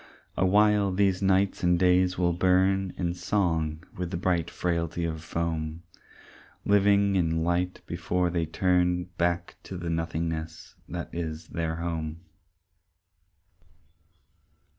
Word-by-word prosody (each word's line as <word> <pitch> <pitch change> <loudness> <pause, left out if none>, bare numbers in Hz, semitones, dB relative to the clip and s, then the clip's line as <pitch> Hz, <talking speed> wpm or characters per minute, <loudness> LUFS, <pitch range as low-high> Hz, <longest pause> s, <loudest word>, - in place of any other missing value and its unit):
A 95 - +2
while 105 0 +4
these 95 0 +2
nights 95 0 +2
and 90 -1 +3
days 90 0 +3
will 85 -1 +2
burn 95 +2 +2
In 85 -1 -1
song 85 -4 -1
with 90 -1 -3
the 85 - -3
bright 85 -2 0
frailty 85 -1 -2
of 80 -1 -4
foam, 80 0 -3 0.8
Living 100 0 +4
in 80 -3 +1
light 90 +1 -1
before 90 +1 -1
they 85 -2 -1
turn 90 +1 +2 0.2
Back 85 0 0
to 95 - -7
the 85 -1 -3
nothingness 80 -1 -3 0.2
that 85 0 -6
is 80 -2 -5
their 80 -1 -2
home. 80 -1 -4
85 Hz, 120 wpm, -27 LUFS, 85-95 Hz, 0.8 s, while